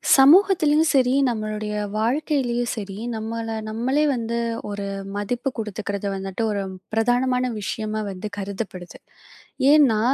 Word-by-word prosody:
சமூகத்திலும் 310 +1 +6
சரி, 255 -3 +3 0.2
நம்மளுடைய 215 -2 -3 0.2
வாழ்க்கையிலும் 245 0 0
சரி, 200 -3 -6 0.2
நம்மள 225 +1 -4 0.2
நம்மளே 255 +7 +1
வந்து 235 -1 -2 0.3
ஒரு 205 -1 -4 0.3
மதிப்பு 240 +6 -2
கொடுத்துக்கிறது 205 -2 -4
வந்துட்டு 195 +3 -4
ஒரு 200 -1 -1 0.3
பிரதானமான 250 +2 +1
விஷயமா 215 +1 -3
வந்து 195 +3 -6
கருதப்படுது. 195 -2 -6 0.7
ஏன்னா, 280 -8 +5
225 Hz, 105 wpm, -23 LUFS, 210-255 Hz, 0.7 s, சமூகத்திலும்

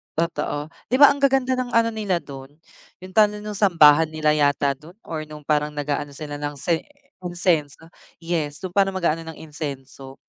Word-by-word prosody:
totoo. 155 -2 -2 0.2
'Di 250 - 0
ba 285 +2 +8
ang 280 - -4
gaganda 265 -2 +2
ng 245 -2 -3
ano 230 0 +3
nila 200 -6 -2
dun, 135 0 -11 0.5
yung 185 - -10
tawag 210 0 +4
sa 210 - -9
nung 210 -1 -5
sambahan 160 -5 +6
nila 155 -1 0
yata 145 -1 +2
dun 165 +6 -15
or 155 -2 -6
nung 150 -1 -11
parang 150 0 0
nag-aano 145 -1 -3
sila 145 -1 -6
ng 145 0 -4
sen 160 +5 0 0.5
insienso, 165 -3 -1 0.3
yes, 155 -4 -2
nung 185 - -4
parang 195 0 +2
mag-aano 165 -2 0
ng 160 - -7
insienso 140 -3 -7
160 Hz, 180 wpm, -23 LUFS, 145-190 Hz, 0.5 s, ba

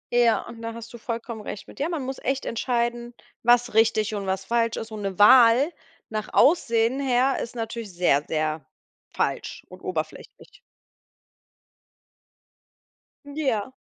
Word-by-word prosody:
Ja, 235 -2 +3
und 230 -1 -10
da 230 0 -5
hast 230 0 -10
du 235 - -9
vollkommen 230 -1 -5
recht 205 - -7
mit, - - -14
ja, 295 +4 0
man 315 -6 -3
muss 265 0 -5
echt 270 +1 -2
entscheiden, 240 0 -2 0.3
was 240 0 +3
richtig 220 -1 +3
und 200 -2 -4
was 190 0 -2
falsch 230 0 0
ist, 225 0 -6
und 215 - -6
'ne 195 -2 -4
Wahl 245 +7 +6 0.4
nach 215 -1 -4
Aussehen 240 -5 +3
her 260 0 +2
ist 235 - -7
natürlich 225 -2 -5
sehr, 175 -5 +2
sehr 155 0 -1 0.5
falsch - - -3
und - - -13
oberflächlich. - - -6 2.7
Ja. 265 -6 -2
230 Hz, 145 wpm, -25 LUFS, 215-245 Hz, 2.7 s, Wahl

